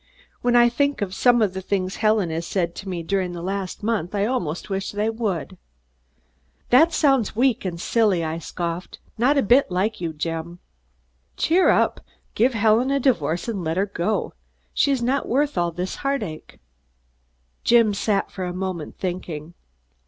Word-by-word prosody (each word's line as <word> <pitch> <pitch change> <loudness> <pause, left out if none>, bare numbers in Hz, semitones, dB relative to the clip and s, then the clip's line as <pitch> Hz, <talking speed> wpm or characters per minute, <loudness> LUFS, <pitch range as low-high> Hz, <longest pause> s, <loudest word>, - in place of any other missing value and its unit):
When 245 0 +2
I 240 0 +7
think 280 -1 0
of 185 -2 -5
some 240 +2 +4
of 195 -3 0
the 190 - -4
things 190 -1 -2
Helen 215 -5 +2
has 165 +1 -3
said 170 -3 -1
to 195 - -8
me 175 -2 -4
during 185 0 -1
the 170 - -6
last 195 +1 -4
month, 210 -4 -1
I 200 0 +1
almost 180 -10 -2
wish 195 -1 -3
they 210 +2 -1
would." 195 -5 -3 1.1
"That 315 +7 +6
sounds 270 -10 +2
weak 245 -2 +2
and 170 -2 -3
silly," 205 -4 +2
I 160 +1 -3
scoffed; 170 +2 -5 0.2
"not 270 +5 +3
a 275 - +3
bit 245 +5 +4
like 190 +3 -1
you, 170 -2 -2
Jim. 165 +2 -4 0.8
Cheer 355 +4 +3
up! - - +2 0.3
Give 245 +2 +2
Helen 225 +4 +3
a 275 0 +2
divorce 175 - 0
and 205 -6 -3
let 160 +1 -2
her 195 - +2
go! 200 +1 -2 0.4
She's 275 -4 +2
not 265 +3 0
worth 285 +3 +1
all 175 -1 +1
this 180 +2 -4
heartache." 220 - -4 1.1
Jim 230 -3 +4
sat 200 0 0
for 185 - -4
a 180 - -4
moment 185 -4 -4
thinking. 175 -3 -5
200 Hz, 170 wpm, -23 LUFS, 175-235 Hz, 1.1 s, I